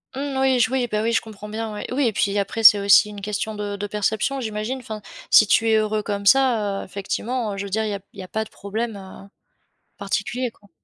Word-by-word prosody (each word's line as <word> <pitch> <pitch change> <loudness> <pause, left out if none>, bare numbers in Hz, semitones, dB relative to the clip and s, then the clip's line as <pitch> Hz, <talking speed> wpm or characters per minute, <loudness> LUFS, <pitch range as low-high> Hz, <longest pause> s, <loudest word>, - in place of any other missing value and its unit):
Mmh 275 -1 -3
oui 260 -2 +3
je 235 +1 +3
oui, 255 -2 0
bah 215 0 -1
oui 230 - +1
je 230 - +2
comprends 210 -1 -10
bien, 220 0 -4
ouais. 210 - -6
Oui 270 -2 +2
et 220 - -1
puis 200 +1 0
après 225 +3 -3
c'est 210 -1 +9
aussi 200 +1 +5
une 205 -1 -9
question 210 +1 -3
de 205 -1 -4
de 205 +1 -4
perception, 215 +6 -1
j'imagine? 220 +3 -3
Enfin, 215 -3 -8 0.3
si 215 - +7
tu 225 +2 +3
es 220 - +4
heureux 215 0 +1
comme 200 -1 -4
ça, 220 -4 +3
heu, - - -7
effectivement, 210 +3 -3
je 200 - -4
veux - - -7
dire 220 +3 0
il - - -2
y - - -2
a 200 - -4
il 200 - -13
y - - -5
a - - -10
pas 220 +3 -2
de - - -13
problème, 220 +2 -4
heu, 195 +1 -12 0.7
particulier 225 +5 -2
quoi. 205 -3 -25
215 Hz, 255 wpm, -22 LUFS, 200-230 Hz, 0.7 s, c'est